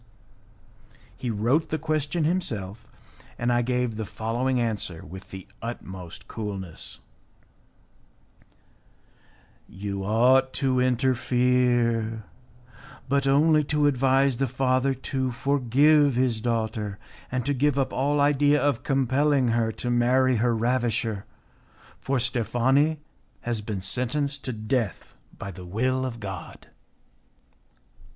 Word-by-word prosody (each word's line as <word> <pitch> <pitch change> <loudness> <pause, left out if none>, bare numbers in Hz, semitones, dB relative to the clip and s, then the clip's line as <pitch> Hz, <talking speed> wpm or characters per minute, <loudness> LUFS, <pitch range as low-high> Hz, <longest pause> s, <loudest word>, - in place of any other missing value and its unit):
He 125 - -4
wrote 115 +9 +1
the 155 - -1
question 155 +1 -1
himself, 115 - -2 0.5
and 120 +1 +1
I 120 - +3
gave 125 -2 -1
the 110 - -2
following 120 +5 -1
answer 105 -8 -2
with 95 +5 -10
the 95 -1 -9 0.2
utmost 95 -7 -7
coolness: 100 -6 -6 2.7
"You 100 0 -5
ought 125 +6 +3
to 130 -2 +1
interfere, 125 -3 +1 0.8
but 140 +1 +1
only 150 +3 +4
to 150 0 +1
advise 135 -1 +3
the 135 +1 0
father 130 +1 +1
to 130 0 -2
forgive 140 +2 +3
his 120 -3 +1
daughter 110 -3 -2 0.3
and 125 -1 -2
to 145 - +1
give 140 +1 +1
up 135 - 0
all 145 +3 +1
idea 145 0 +4
of 145 -5 +1
compelling 135 0 +2
her 115 -1 +1
to 120 - -3
marry 125 +1 +3
her 120 +1 +2
ravisher, 115 -3 0 0.7
for 135 0 -1
Steffani 130 +6 +1 0.4
has 120 -2 -2
been 105 -2 -4
sentenced 130 +8 0
to 130 - -1
death 110 -2 -2 0.2
by 100 - -6
the 90 0 -10
will 130 +7 0
of 120 -2 -7
God." 95 -4 -8
125 Hz, 115 wpm, -25 LUFS, 110-135 Hz, 2.7 s, only